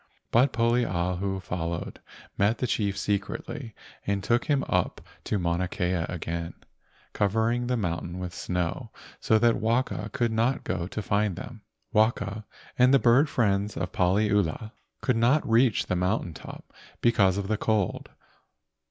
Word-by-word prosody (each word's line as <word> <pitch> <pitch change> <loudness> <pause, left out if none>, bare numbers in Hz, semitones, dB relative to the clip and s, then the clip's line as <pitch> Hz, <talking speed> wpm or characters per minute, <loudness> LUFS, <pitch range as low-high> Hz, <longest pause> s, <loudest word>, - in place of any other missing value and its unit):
But 125 +4 +4
Poliahu 95 -5 0
followed, 85 -1 -4 0.4
met 105 +4 +2
the - - -1
chief 100 -4 -1
secretly 105 +5 -3 0.3
and 100 -1 0
took 120 +4 +1
him 140 -2 +1
up 90 -2 0 0.3
to 105 - 0
Mauna 85 0 0
Kea 90 0 -1 0.2
again, 85 -1 -4 0.6
covering 115 +4 +1
the 125 0 0
mountain 85 -3 -3
with 90 -1 -5
snow 90 -3 -3 0.3
so 110 - +3
that 115 +1 +3
Waka 115 +4 0
could 120 -2 0
not 115 +4 +1
go 90 -2 -2
to 105 - -4
find 100 -2 +1
them. - - -9 0.3
Waka 110 -1 +1 0.3
and 125 +1 +6
the 135 - +7
bird 130 +4 +4
friends 105 -4 0
of 90 - -3
Paliula 100 +1 +1 0.3
could 125 -3 +1
not 125 +7 +3
reach 115 0 +3
the 90 - -1
mountain 90 -1 0
top - - -11 0.3
because 100 -5 +3
of 100 -1 -2
the 110 - +1
cold. 105 -3 -1
105 Hz, 145 wpm, -27 LUFS, 90-115 Hz, 0.6 s, the